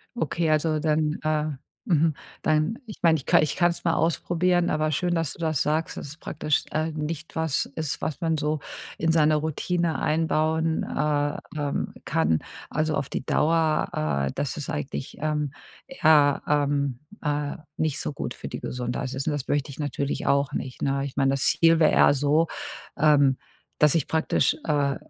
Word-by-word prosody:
Okay, 165 - -1
also, 155 0 +2
dann, 155 0 +1
äh, 155 -1 +1 0.4
mhm 160 -2 +3 0.3
dann 155 +9 +1
ich 215 - -9
meine, 165 -2 +5
ich 135 - -9
ka - - +5
ich 150 -1 +1
kann 175 -1 +4
es 170 - -8
mal 165 - +3
ausprobieren, 175 +2 +1
aber 155 0 +1
schön, 175 +4 0
dass 165 -3 0
du - - -17
das 160 -4 0
sagst, 155 +2 0
dass - - -6
es 145 +3 -10
praktisch, 150 -2 -1
äh, 155 +1 -1
nicht 155 +1 -5
was 160 -3 +1
ist, 155 -2 -3
was 155 - -3
man 165 -2 +1
so 150 0 -1 0.4
in 165 0 +1
seine 155 -1 +4
Routine 160 +2 -1
einbauen, 160 +1 +1
äh, 145 -1 0 0.2
ähm, 145 -1 -2
kann, 80 0 +2 0.3
also, 155 0 0
auf 140 -1 -2
die - - -4
Dauer. 150 - +1
Äh, - - -2
das 140 0 -2
ist 150 +2 -5
eigentlich, 145 -4 -4
ähm, 150 -2 -1 0.4
eher, 155 - +4
ähm, 140 -3 +1 0.2
äh, 145 -1 -1 0.2
nicht 155 -3 0
so - - -3
gut 140 - -5
für - - -8
die - - -5
Gesundheit 125 +1 -3
ist. 135 +2 -4
Und - - +2
das 145 -2 -4
möchte 145 0 0
ich 135 - -12
natürlich 140 -1 -2
auch 140 0 +2
nicht, 130 -3 -5
ne? 135 0 0
Ich 140 - -7
meine, 135 -1 +2
das 135 -1 0
Ziel 165 -1 +4
wäre 155 - +5
eher - - +5
so, 145 +4 +2 0.5
ähm, 145 -3 +4 0.4
dass 150 -2 +5
ich 160 -5 +1
praktisch, 160 -1 +2
äh, 145 -3 +1
150 Hz, 185 wpm, -25 LUFS, 145-160 Hz, 0.5 s, meine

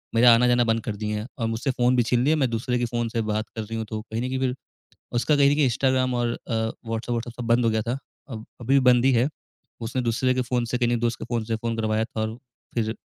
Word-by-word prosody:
मेरा 120 0 +7
आना-जाना 120 0 +4
बंद 115 0 +1
कर 110 -4 -3
दिए 105 0 -2
हैं 110 - -6
और 115 -2 -1
मुझसे 115 +5 -1
फोन 125 0 +2
भी 120 - +4
छीन 120 +2 +1
लिए 150 +3 +3
हैं, 155 - +1
मैं 130 -3 +2
दूसरे 120 +2 -1
के 120 - +1
फोन 120 -1 -2
से 115 0 -1
बात 110 0 -2
कर 110 - -3
रही 115 +1 -5
हूँ।" 110 - -3
तो 110 +1 -5
कहीं 110 +2 -5
न 125 - -1
कहीं 130 0 -2
फिर, 130 -1 0 0.6
उसका 125 +5 +2
कहीं 140 0 +5
न - - +2
कहीं 150 -2 +3
इंस्टाग्राम 130 0 +1
और 120 0 +1
अ, 120 - -7 0.3
व्हॉट्सएप-व्हॉट्सएप 115 +1 -3
सब - - -4
बंद 120 0 +3
हो 115 - +3
गया 110 0 +1
था। 120 +3 -2 0.3
अब 110 -2 -7 0.2
अभी 130 +4 +1
भी 140 - +6
बंद 125 +1 +3
ही 135 - +5
है, 125 +4 +3 0.5
उसने 120 +3 -2
दूसरे 125 +2 +1
के 130 - +1
फोन 120 -1 -1
से, 125 +2 -2
कहीं 120 -1 +1
न - - +2
एक 120 - 0
दोस्त 120 0 0
के - - -5
फोन 120 -2 -1
से 115 0 -1
फोन 115 +1 -3
करवाया 110 0 +1
था 110 -2 -5
और 110 +2 -3 0.4
फिर 110 -1 0
120 Hz, 290 wpm, -25 LUFS, 115-125 Hz, 0.6 s, मेरा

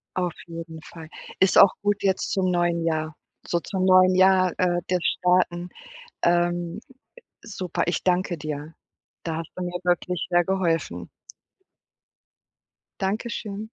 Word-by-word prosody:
Auf 180 -2 -1
jeden 165 -1 -8
Fall. 160 -2 -12 0.3
Ist 190 - +4
auch 195 - +8
gut 205 0 0
jetzt 190 -1 0
zum 190 -1 +1
neuen 175 -1 +1
Jahr, 155 -1 -1 0.3
so 170 - 0
zum 185 +2 -2
neuen 185 0 +6
Jahr, 185 -1 +5
äh, 175 -1 +1
das 180 0 +1
Starten, 180 -1 +1 0.5
ähm, 175 +1 +1
ä - - -17 0.5
super, 185 -4 -3
ich 175 - -1
danke 180 -1 +1
dir. 155 0 -6 0.5
Da 165 -2 -3
hast 165 - -7
du 180 - -4
mir 180 0 -4
wirklich 180 0 0
sehr 175 0 +3
geholfen. 175 -3 -1 1.9
Dankeschön. 210 +1 -3
180 Hz, 135 wpm, -24 LUFS, 170-185 Hz, 1.9 s, auch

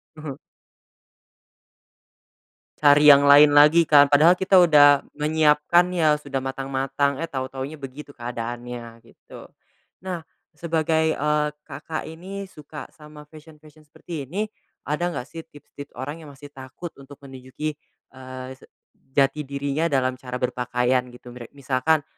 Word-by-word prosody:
Mhm. 150 -3 -8 2.5
Cari 145 0 +5
yang 140 -1 +8
lain 145 +1 +7
lagi 150 +3 +6
kan. 145 -1 +5
Padahal 160 +5 +6
kita 190 0 +3
udah 145 -4 +6 0.2
menyiapkan 155 +3 +2
ya, 155 -3 +2
sudah 135 -2 -5
matang-matang, 135 +2 -2
eh - - -3
tahu-tahunya 135 +3 -6
begitu 140 +2 -10
keadaannya 120 -1 -7
gitu. - - -15 0.6
Nah 180 -2 -4 0.3
sebagai, 160 0 -1
eee, 150 0 0 0.2
Kakak 155 +2 -7
ini 190 +5 -8
suka 150 0 -11
sama 150 -2 -14
fashion-fashion 155 -1 -17
seperti 150 -3 -8
ini, 200 +8 -3 0.4
ada 150 +4 -2
nggak 170 - -4
sih 165 - -10
tips-tips 145 -1 -14
orang 145 +5 -6
yang 155 -2 -12
masih 145 +1 -13
takut 135 +6 -10
untuk 140 +1 -13
menujuki, 135 +3 -7 0.4
eee, 130 0 -10
se - - -18 0.5
jati 140 +1 +1
dirinya 140 +3 -2
dalam 130 -3 -1
cara 125 -1 -7
berpakaian 125 0 -1
gitu, 125 0 -14
mira 120 -1 -10
misalkan 140 +3 0
145 Hz, 130 wpm, -23 LUFS, 130-155 Hz, 2.5 s, yang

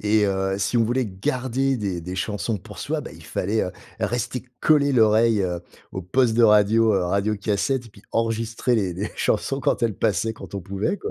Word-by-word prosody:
Et 105 0 +3
heu, 95 0 0
si 100 +5 0
on 115 - +4
voulait 125 +1 0
garder 130 +7 -1
des 95 -5 -3
des 90 +2 -6
chansons 105 +3 -2
pour - - -12
soi, - - -2
bah, - - -8
il - - -14
fallait, 105 +4 -1
heu, 90 - -3 0.3
rester 120 +1 -2 0.2
coller 145 -2 +4
l'oreille 110 -2 +4 0.5
au 95 - -4
poste 115 +5 +2
de 120 - +4
radio, 110 +1 +5
heu, 95 - +2
radio 100 +4 0
cassette 110 +5 -1
et - - -12
puis 100 - -18
enregistrer 115 +2 0
les 95 -4 0
les 100 +5 -4
chansons 135 +5 0
quand 125 - 0
elles 115 -3 +1
passaient, 110 +2 0
quand 105 - -11
on 100 - -3
pouvait, 100 - -2
quoi. 430 - -5
110 Hz, 205 wpm, -23 LUFS, 100-120 Hz, 0.5 s, radio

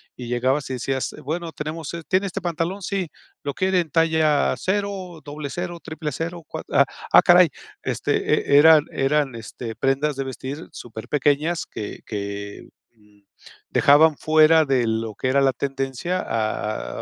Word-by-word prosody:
y 125 - -8
llegabas 130 +4 0
y - - -3
decías: 130 +1 -2
"Bueno, 165 +3 -4
tenemos 155 +1 -6
es 170 -2 -7
¿tiene 190 +2 +1
este 180 - -4
pantalón?", 175 +3 -2
"Sí, 190 -2 -2 0.3
¿lo 140 - -3
quiere 185 +2 +1
en 165 - -7
talla 160 -3 +2
0, 190 -3 -3
00, 155 +4 -6
000, 165 +2 -5
cua", - - -6
ah - - +5 0.3
ah, - - +8
caray, - - +6 0.3
este, - - 0
e - - +8
eran 155 0 +7
eran, 135 -1 0
este, 115 0 -7
prendas 135 +4 0
de 135 - -2
vestir 135 +3 -7
superpequeñas 145 +8 -1
que 105 - -7
que, 100 -1 -6 0.3
um, 105 -2 -26 0.5
dejaban 150 +2 +5
fuera 155 +1 +5
de 130 -5 +1
lo 110 0 -2
que 130 - -3
era 135 +2 +3
la 135 -1 +4
tendencia 135 +6 -3
a 110 - -3
145 Hz, 150 wpm, -23 LUFS, 130-165 Hz, 0.5 s, ah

